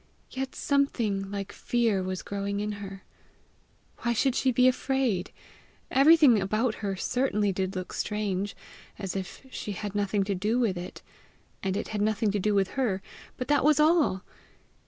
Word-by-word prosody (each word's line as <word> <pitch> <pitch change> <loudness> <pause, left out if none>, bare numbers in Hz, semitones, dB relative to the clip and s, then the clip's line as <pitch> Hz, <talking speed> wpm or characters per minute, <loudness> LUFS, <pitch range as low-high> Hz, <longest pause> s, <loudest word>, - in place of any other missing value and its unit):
Yet 265 0 -4
something 230 -9 0
like 200 -1 -4
fear 230 -5 0
was 185 0 -4
growing 200 0 -3
in 210 +1 -2
her! 195 -1 -8 1.0
Why 235 - 0
should 260 +3 +2
she 260 +1 +2
be 250 +1 +4
afraid? 255 -7 +1 0.6
Everything 280 -5 +6
about 215 +5 +1
her 200 -2 -1
certainly 210 -1 0
did 190 0 -2
look 185 -1 -5
strange, 205 -2 -2 0.4
as 195 -2 -4
if 190 +7 -6
she 210 - -5
had 205 +1 -5
nothing 205 -1 +1
to 200 +1 -1
do 210 +5 0
with 220 -7 +1
it, 175 +1 -7 0.6
and 195 0 -1
it - - -4
had 210 -1 -2
nothing 215 0 +1
to 205 - 0
do 210 +2 +1
with 195 -1 +2
her; 220 -8 -1 0.3
but 255 - -4
that 290 -3 +3
was 305 +1 +4
all! 305 - +3
210 Hz, 165 wpm, -28 LUFS, 195-255 Hz, 1.0 s, Everything